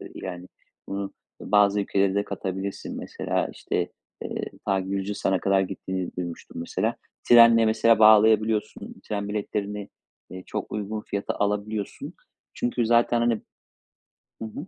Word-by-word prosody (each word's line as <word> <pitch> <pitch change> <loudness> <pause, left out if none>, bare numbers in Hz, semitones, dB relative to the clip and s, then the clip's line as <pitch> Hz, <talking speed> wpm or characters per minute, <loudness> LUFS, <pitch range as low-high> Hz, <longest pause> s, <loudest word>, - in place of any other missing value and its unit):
değil - - -10
hani. 90 -1 -6 0.4
Bunu 100 0 -3 0.4
ı, - - -9
bazı 105 0 +5
ülkelere 100 -1 +1
de 100 0 +1
katabilirsin. 95 0 -5
Mesela, - - -2
işte, - - -3 0.3
eee, - - -3 0.2
ta 95 -1 +2
Gürcistan'a 95 0 -1
kadar 95 0 +3
gittiğini 95 -1 -3
duymuştum 85 -1 -6
mesela. 85 - -1 0.3
Trenle 115 -1 +8
mesela 110 0 +4
bağlayabiliyorsun. 110 0 +4
Tren 100 -1 -2
biletlerini, 105 -1 -3 0.4
eee, 95 0 -8
çok - - -5
uygun 105 +1 -3
fiyata 100 -1 -3
alabiliyorsun. 105 0 -3 0.4
Çünkü 120 -1 -1
zaten 120 +1 +3
hani 120 0 +3 1.1
Hı - - -3
hı. 140 - -7
105 Hz, 130 wpm, -25 LUFS, 95-110 Hz, 1.1 s, Trenle